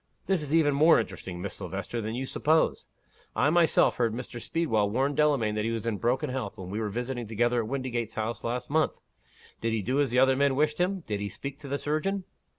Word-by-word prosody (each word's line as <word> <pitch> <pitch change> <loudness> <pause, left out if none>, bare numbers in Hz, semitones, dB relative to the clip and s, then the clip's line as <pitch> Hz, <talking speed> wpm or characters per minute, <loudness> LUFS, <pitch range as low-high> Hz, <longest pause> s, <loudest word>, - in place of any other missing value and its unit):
This 190 -4 +1
is 150 +1 -1
even 150 -3 +4
more 155 +4 +6
interesting, 90 -2 -5
Miss 100 - -4
Silvester, 100 +5 -4
than 110 +1 -3
you 130 +2 -2
suppose. 155 +4 +1 0.5
I 145 +3 +3
myself 170 -1 +4
heard 115 -2 +1
Mr. 120 -1 -6
Speedwell 115 -12 +1
warn 135 +6 +1
Delamayn 140 -8 +2
that 105 0 -1
he 115 - 0
was 115 -1 -3
in 110 -4 -1
broken 125 +2 0
health, 115 -5 -4
when 95 -2 -7
we 105 - -2
were 110 -2 -1
visiting 120 +2 -3
together 120 +2 +1
at 110 - -5
Windygates 120 -4 -3
House 110 +1 -3
last 120 +1 -2
month. 155 0 +2 0.7
Did 115 0 0
he 110 -2 -1
do 130 +7 +1
as 140 - +1
the 120 - 0
other 130 +1 +5
men 140 0 +2
wished 150 +2 +1
him? 185 +1 +1
Did 105 -9 -3
he 100 0 -3
speak 140 +7 -7
to 150 - -9
the 140 +1 -1
surgeon?" 170 +7 -1
125 Hz, 230 wpm, -28 LUFS, 110-145 Hz, 0.7 s, more